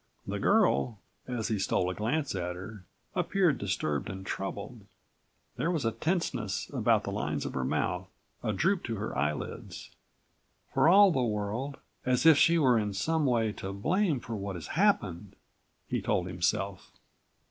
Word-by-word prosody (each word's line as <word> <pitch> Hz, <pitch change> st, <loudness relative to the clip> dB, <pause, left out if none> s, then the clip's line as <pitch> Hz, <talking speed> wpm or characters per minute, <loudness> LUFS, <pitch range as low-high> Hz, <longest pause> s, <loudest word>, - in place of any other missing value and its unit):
The -, -, -3 dB
girl, 105 Hz, -, +3 dB, 0.3 s
as 120 Hz, -3 st, -2 dB
he 110 Hz, -3 st, 0 dB
stole 90 Hz, -1 st, +1 dB
a -, -, -3 dB
glance 135 Hz, -, -1 dB
at 90 Hz, -2 st, -3 dB
her, 95 Hz, +1 st, -9 dB, 0.3 s
appeared 180 Hz, -6 st, +2 dB
disturbed 75 Hz, -7 st, -1 dB
and 95 Hz, -1 st, -7 dB
troubled. -, -, -5 dB, 0.7 s
There 165 Hz, -, 0 dB
was 160 Hz, -8 st, -1 dB
a 115 Hz, -, +2 dB
tenseness 170 Hz, +10 st, -2 dB
about -, -, +3 dB
the -, -, -4 dB
lines 75 Hz, 0 st, -2 dB
of -, -, -4 dB
her 65 Hz, -, -1 dB
mouth, 65 Hz, -, -1 dB, 0.3 s
a -, -, -1 dB
droop 180 Hz, -, +1 dB
to 115 Hz, -, -2 dB
her 110 Hz, +1 st, -4 dB
eyelids. 75 Hz, +3 st, -3 dB, 0.8 s
"For 160 Hz, -, +5 dB
all 200 Hz, +1 st, +8 dB
the 135 Hz, -, +1 dB
world 115 Hz, +5 st, -2 dB, 0.3 s
as 125 Hz, +2 st, +1 dB
if 160 Hz, -3 st, +8 dB
she 170 Hz, 0 st, +5 dB
were 130 Hz, -7 st, +4 dB
in 105 Hz, -2 st, -2 dB
some 160 Hz, +7 st, +1 dB
way 115 Hz, -3 st, +2 dB
to 95 Hz, -1 st, -6 dB
blame 160 Hz, -, +1 dB
for 115 Hz, -1 st, -6 dB
what 100 Hz, -2 st, -4 dB
has 85 Hz, -, -7 dB
happened," 105 Hz, -, +1 dB, 0.5 s
he -, -, -1 dB
told 90 Hz, -, 0 dB
himself. 95 Hz, +2 st, -2 dB
110 Hz, 165 wpm, -30 LUFS, 95-150 Hz, 0.8 s, all